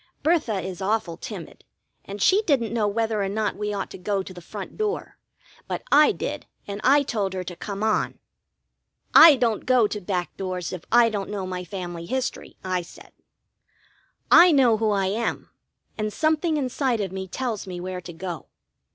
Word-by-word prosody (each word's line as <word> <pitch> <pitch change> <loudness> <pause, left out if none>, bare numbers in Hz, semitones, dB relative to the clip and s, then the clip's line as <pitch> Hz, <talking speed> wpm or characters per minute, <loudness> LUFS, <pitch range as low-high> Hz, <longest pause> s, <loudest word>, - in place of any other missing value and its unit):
Bertha 295 - +1
is 185 0 -6
awful 190 -4 -1
timid, - - -9 0.4
and 200 0 -4
she 390 +3 +5
didn't 245 -7 +1
know 220 -3 +1
whether 220 0 0
or 195 - -1
not 210 +1 -1
we 210 0 -3
ought 200 -2 -4
to - - -9
go 195 +1 -1
to 185 - -10
the 175 - -11
front 195 +3 -8
door; 430 0 -3 0.5
but - - -4
I 300 +1 +7
did, - - -5 0.2
and 200 +1 -5
I 285 +2 +5
told 205 -7 -2
her 185 -1 -3
to 175 0 -7
come 200 +3 -5
on. 220 -1 0 1.0
"I 320 -2 +10
don't 235 -4 0
go 255 -3 +5
to 210 0 -3
back 180 -2 -3
doors, 185 -2 -4
if 180 -2 -7
I 235 -1 +6
don't 205 -3 -4
know 200 -2 -3
my 180 -1 -4
family 175 -2 -6
history," 260 +4 -3
I 185 -1 -1
said. 170 - -14 1.2
"I 350 +1 +9
know 255 -7 +4
who 220 0 +1
I 200 -2 +1
am, 215 +5 -2 0.5
and 215 0 -1
something 315 - +1
inside 260 -3 0
of 195 -3 -2
me 190 0 -5
tells 225 0 -4
me 180 -1 -6
where 180 0 -5
to 175 0 -9
go." 170 -1 -6
205 Hz, 185 wpm, -24 LUFS, 185-240 Hz, 1.2 s, I